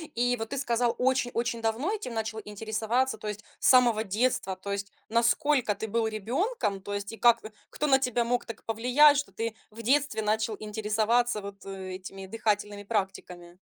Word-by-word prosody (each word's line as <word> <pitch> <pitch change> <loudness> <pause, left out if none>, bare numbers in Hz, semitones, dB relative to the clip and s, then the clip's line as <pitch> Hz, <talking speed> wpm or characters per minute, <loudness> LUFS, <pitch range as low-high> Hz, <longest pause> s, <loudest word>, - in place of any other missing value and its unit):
И 245 +1 +2
вот 225 0 -5
ты 280 - -4
сказал, 240 -3 +1
очень-очень 245 -2 0
давно 225 - 0
этим 420 - -5
начал 220 0 -3
интересоваться, 220 +4 -1
то 215 - -7
есть 210 +1 -5 0.2
с - - +1
самого 240 -4 +5
детства, 210 -2 0
то 195 +2 -7
есть 200 0 -3 0.2
насколько 240 +1 +2
ты 220 +2 -5
был 225 +1 0
ребёнком, 220 - -1
то 205 - -6
есть, 200 0 -4
и 225 - -8
как 235 -1 +5 0.3
кто 300 - -2
на 270 -1 +5
тебя 250 -2 +1
мог 245 +1 0
так 230 -2 -8
повлиять, 250 +6 +5
что 275 -8 -2
ты 225 +3 -3 0.2
в 225 +2 -9
детстве 265 -2 +2
начал 220 +1 0
интересоваться 215 +2 +1
вот, 200 0 -9
э, 190 -1 -6
этими 190 +1 -8
дыхательными 210 -1 -1
практиками? 185 -4 -4
225 Hz, 180 wpm, -28 LUFS, 210-245 Hz, 0.3 s, самого